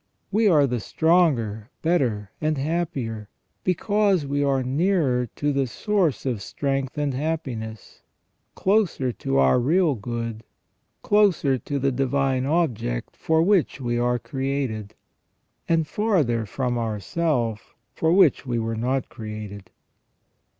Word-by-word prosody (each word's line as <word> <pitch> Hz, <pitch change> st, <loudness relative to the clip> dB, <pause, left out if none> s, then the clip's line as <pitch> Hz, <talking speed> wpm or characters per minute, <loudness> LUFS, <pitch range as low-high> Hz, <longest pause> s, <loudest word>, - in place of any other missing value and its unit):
We 215 Hz, +1 st, +3 dB
are 155 Hz, -7 st, +5 dB
the 125 Hz, -2 st, -1 dB
stronger, 125 Hz, -, +1 dB
better, 120 Hz, -, 0 dB
and 155 Hz, -1 st, 0 dB
happier, 135 Hz, -, -2 dB, 0.3 s
because 195 Hz, -1 st, +1 dB
we 140 Hz, +1 st, 0 dB
are 135 Hz, -2 st, +1 dB
nearer 135 Hz, -, +1 dB
the 140 Hz, -2 st, 0 dB
source 180 Hz, -, 0 dB
of 120 Hz, -6 st, -1 dB
strength 135 Hz, +5 st, -2 dB
and 145 Hz, -2 st, 0 dB
happiness, 130 Hz, -, -4 dB, 0.5 s
closer 190 Hz, -, +1 dB
to 70 Hz, -, -2 dB
our 70 Hz, -, +4 dB
real 160 Hz, +5 st, +3 dB
good, 115 Hz, -1 st, -5 dB, 0.6 s
closer 185 Hz, -11 st, +3 dB
to 140 Hz, +5 st, -3 dB
the 135 Hz, 0 st, +1 dB
divine 135 Hz, 0 st, 0 dB
object 130 Hz, -, -1 dB
for 160 Hz, 0 st, +2 dB
which 190 Hz, -6 st, +2 dB
we 120 Hz, -2 st, -1 dB
are 120 Hz, 0 st, +1 dB
created, 130 Hz, -6 st, -3 dB, 0.7 s
and 165 Hz, -1 st, +3 dB
farther 150 Hz, -, 0 dB
from 125 Hz, +2 st, -2 dB
our 110 Hz, -2 st, -2 dB
self, 120 Hz, -, -2 dB, 0.2 s
for 160 Hz, -, +1 dB
which 180 Hz, -4 st, +5 dB
we 125 Hz, -3 st, -2 dB
were 115 Hz, 0 st, -2 dB
not 125 Hz, +3 st, -1 dB
created. 105 Hz, -2 st, -8 dB
135 Hz, 125 wpm, -24 LUFS, 115-160 Hz, 0.7 s, are